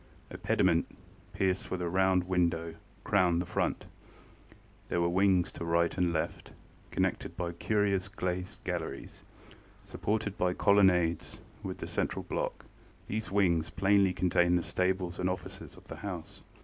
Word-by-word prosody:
A - - -6
pediment, - - +2 0.4
pierced 95 -1 0
with 95 - -2
a 90 - -1
round 95 +1 +3
window, 85 -2 0 0.3
crowned 90 -4 +3
the 90 - -1
front. - - -1 1.0
There 85 - 0
were 85 - +2
wings 95 0 +3
to - - -7
right 85 0 +1
and 90 -2 +1
left, 80 -1 -3 0.4
connected 85 - -1
by 90 -2 -2
curious 100 +1 0
glazed 90 -1 -4
galleries, 85 -6 -5 0.6
supported 105 -1 -2
by 90 0 +1
colonnades, 90 -5 +3 0.2
with - - -5
the - - -5
central - - -2
block. - - -3 0.4
These 110 +2 -3
wings 85 -5 +2
plainly 100 +2 +3
contained 90 -1 +3
the 85 - -1
stables 90 -1 -1
and 90 0 +1
offices 90 - -6
of - - -14
the - - -8
house. 90 -5 -6
90 Hz, 145 wpm, -31 LUFS, 85-95 Hz, 1.0 s, round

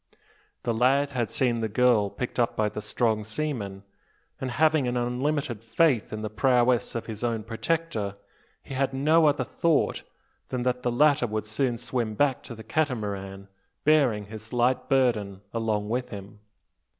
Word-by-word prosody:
The 120 - 0
lad 135 +5 +3
had 120 -5 -1
seen 120 -3 +1
the 110 -1 -1
girl 115 -2 +3
picked 120 +5 -5
up 120 - +1
by 105 -1 +1
the 105 - -6
strong 110 -1 0
seaman; 105 -5 -4 0.6
and, 130 - -3
having 155 +1 +2
an 125 0 -1
unlimited 125 -1 -1
faith 115 +1 +2
in 110 0 -5
the 110 - -2
prowess 120 +1 +2
of 115 - -3
his 110 0 -6
own 115 -2 -1
protector, 115 -3 -2 0.5
he - - -8
had 135 0 0
no 155 +4 +4
other 140 -3 +2
thought 160 +4 +1 0.5
than 125 -1 -2
that 125 0 0
the 125 - 0
latter 140 0 +4
would 110 -1 -3
soon 120 +3 0
swim 115 -2 -2
back 140 +1 +2
to 120 - -9
the 110 - -10
Catamaran, 100 -8 -2 0.4
bearing 135 -9 +3
his 110 +1 -10
light 125 +1 +1
burden 115 -8 +1
along 110 -2 -1
with 125 +3 -2
him. 100 -1 -9
120 Hz, 165 wpm, -26 LUFS, 110-135 Hz, 0.6 s, no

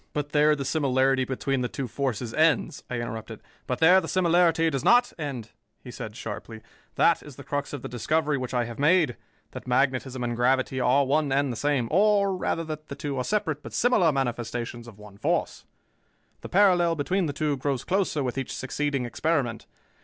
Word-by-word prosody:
"But 145 -1 -2
there 150 +1 +4
the 140 -2 -4
similarity 135 -3 +2
between 135 +1 -2
the 125 - 0
two 135 - -4
forces 120 -1 -3
ends," 160 -1 +1
I 125 - -3
interrupted. 115 -1 -6 0.3
"But 125 - -1
there 180 +4 +6
the - - -6
similarity 170 -2 +3
does 135 -3 -2
not 245 +1 +4
end," 130 -7 -5 0.3
he 125 - -9
said 110 -2 -7
sharply. 110 -1 -7 0.3
"That 170 - +3
is 145 -3 -12
the 140 - -11
crux 145 +2 -3
of 145 -4 -6
the - - -4
discovery 150 +5 0
which 130 -2 -4
I 125 -2 0
have 120 +1 -8
made: 155 -3 +3 0.4
that - - -9
magnetism 130 0 0
and 120 -1 -2
gravity 130 +2 +1
are 130 +3 +3
one 145 +1 +1
and 140 0 +1
the - - -4
same, 140 -1 0
or, 200 +1 +3
rather, 165 -2 -2
that 155 -1 -7
the 140 - -7
two 140 0 -4
are - - 0
separate, 160 -4 -1
but - - -10
similar 220 -9 +3
manifestations 120 -3 -3
of 110 -4 -12
one 105 -1 -14
force. - - -1 0.8
The - - -8
parallel 180 -4 +4
between 175 +4 0
the - - -2
two 145 +1 -1
grows 135 -1 -2
closer 185 -6 0
with 130 +1 -2
each 135 - -5
succeeding 140 0 -2
experiment. 120 -2 -1
140 Hz, 195 wpm, -26 LUFS, 125-160 Hz, 0.8 s, there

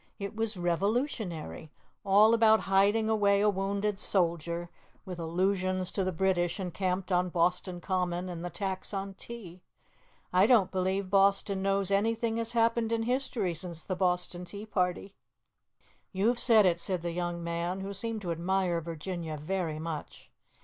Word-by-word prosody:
it 200 +1 -6
was 225 -2 -1
Revolutionary. 180 - -2 0.3
All 210 +3 +6
about 220 -1 +5
hiding 200 +3 +3
away 205 -2 +3
a 210 +1 +4
wounded 200 +1 -1
soldier, 170 -2 -1 0.3
with 180 -3 -7
allusions 185 +2 0
to 195 - -1
the 185 - 0
British 180 0 0
encamped 185 +1 -2
on 180 0 +2
Boston 175 +1 0
Common, 180 -1 -1
and 175 -2 -6
the 175 - -3
tax 190 +2 -4
on 195 0 -4
tea. 190 -4 -10 0.7
I 185 +3 +5
don't 225 -7 +4
believe 190 0 -1
Boston 195 0 +3
knows 195 0 +1
anything 225 +3 +1
has 230 +1 -1
happened 230 -1 +2
in 225 0 +1
history 240 -6 -1
since 165 0 -5
the 185 - -3
Boston 180 -1 0
Tea 200 +4 -8
Party." 190 -1 -1 1.0
"You've 220 +5 +1
said 220 -4 +5
it," 170 -2 +2
said 180 -1 -2
the 170 - -2
young 175 0 -3
man, 170 +3 -2
who 195 +1 -5
seemed 225 +1 -3
to 175 - -2
admire 175 0 0
Virginia 165 0 -5
very 165 0 -2
much. 160 -1 -7
190 Hz, 155 wpm, -30 LUFS, 175-205 Hz, 1.0 s, All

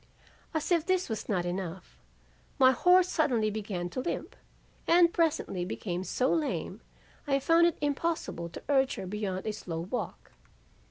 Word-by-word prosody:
As 315 +3 -1
if 340 -3 +4
this 370 -2 0
was 220 -2 -4
not 180 -4 0
enough, 175 - -5 0.6
my 260 -1 +7
horse 360 +7 +5
suddenly 245 -11 +1
began 200 -4 -3
to - - -4
limp 300 - -4 0.5
and 340 0 +5
presently 310 - 0
became 180 0 -4
so 250 +8 +1
lame 315 -3 -2 0.5
I 275 -1 +3
found 330 +5 +4
it 340 - -1
impossible 290 - -2
to - - -10
urge 270 -2 +2
her - - -6
beyond 190 -1 -3
a 215 - -1
slow 165 -5 -5
walk. 195 +9 -5
250 Hz, 155 wpm, -29 LUFS, -, 0.6 s, my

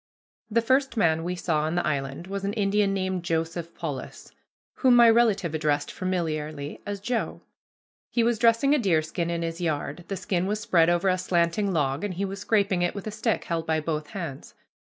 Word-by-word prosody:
The 230 +1 +2
first 265 +1 +2
man 165 -5 +2
we 180 +1 -2
saw 165 -3 0
on 155 +2 -1
the 175 - 0
island 140 0 -2
was 195 +1 -5
an 200 +1 -1
Indian 205 -1 +2
named 190 -2 -1
Joseph 165 0 -2
Polis, 145 -6 -6 0.5
whom 255 -2 +5
my 240 -1 +8
relative 220 -7 +3
addressed 150 -2 0
familiarly 155 -5 -3
as 205 -1 -3
"Joe." 235 +4 -2 0.7
He 235 - +1
was 235 -1 +1
dressing 230 +5 +4
a 300 - +3
deerskin 170 -4 0
in 170 0 -2
his 165 +1 -4
yard. 155 0 -2
The 195 - -3
skin 185 -1 -1
was 210 +1 -1
spread 175 -7 +3
over 175 +2 +2
a 185 0 +2
slanting 175 +3 +1
log, 145 -2 0
and 200 -3 -3
he 195 +3 -1
was 195 +1 -5
scraping 200 -3 +1
it 175 +2 0
with 200 - -6
a 215 - -3
stick 220 +1 -1
held 165 -1 -3
by 160 -1 +2
both 155 -1 -3
hands. 160 -6 -7
180 Hz, 200 wpm, -26 LUFS, 160-205 Hz, 0.7 s, my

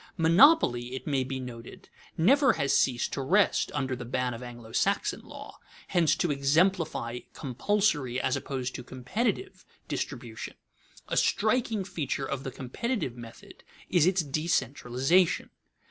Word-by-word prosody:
Monopoly, 165 - +5
it 130 - -7
may 140 -3 +1
be 130 +1 -4
noted, 120 -2 -9 0.3
never 265 - +5
has 140 - +1
ceased 125 -2 +1
to 140 - -2
rest 190 +9 +2
under 135 -3 -1
the 125 - -7
ban 125 +1 -2
of 115 - -8
Anglo 120 -2 -10
Saxon - - 0
law, - - -11 0.3
hence 170 -3 +3
to 175 - 0
exemplify 145 -3 +1
compulsory, 145 - 0
as 130 - 0
opposed 130 -2 -4
to 125 - -7
competitive, 205 - -3 0.2
distribution. - - -5 0.5
A - - -2
striking 220 -1 +1
feature 145 -6 -3
of 135 0 -4
the 135 - -4
competitive 135 - -3
method 115 -2 -12 0.3
is 175 -2 +4
its 185 -2 +2
decentralization. 145 +1 +1
140 Hz, 135 wpm, -28 LUFS, 125-185 Hz, 0.5 s, Monopoly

